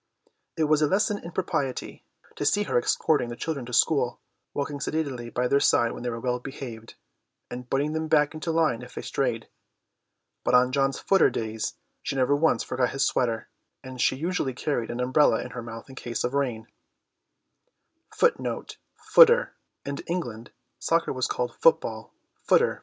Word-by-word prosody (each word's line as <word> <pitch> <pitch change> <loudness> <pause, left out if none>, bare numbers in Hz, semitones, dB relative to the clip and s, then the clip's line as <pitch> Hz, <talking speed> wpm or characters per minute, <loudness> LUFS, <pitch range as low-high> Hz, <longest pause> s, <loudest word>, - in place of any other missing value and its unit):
It 160 - +2
was 155 0 +3
a 150 - +4
lesson 205 +3 +1
in 170 - -8
propriety 145 -8 -3 0.3
to - - -4
see 205 +8 +2
her - - -3
escorting 135 0 +1
the 120 - -5
children 140 -2 -4
to - - -8
school, 125 -3 +2 0.3
walking 145 0 -3
sedately 140 -6 -3
by 125 +1 0
their 140 +2 +3
side 120 -4 +3
when - - -7
they 120 - -2
were 115 -1 -4
well 125 +1 -1
behaved, 120 -4 -8 0.6
and 125 0 -7
butting 145 +3 0
them 160 0 -2
back 150 -1 +3
into 155 +1 -5
line 160 -8 +1
if 125 - -12
they - - -5
strayed. - - -2 1.0
On 125 0 +4
John's 135 0 +1
footer 195 - +4
days 110 -1 -3 0.3
she - - -3
never 135 +2 +3
once 145 -5 +2
forgot 125 -1 0
his 135 0 0
sweater, 115 -3 0 0.4
and 130 -1 -6
she - - +3
usually 155 -3 -2
carried 125 -4 -2
an 120 - -4
umbrella 130 +4 +3
in 125 - -8
her 125 - -6
mouth 115 -1 -9
in 135 - -12
case 120 -3 -4
of 125 - -1
rain. 125 -6 -1
130 Hz, 145 wpm, -26 LUFS, 120-150 Hz, 1.0 s, a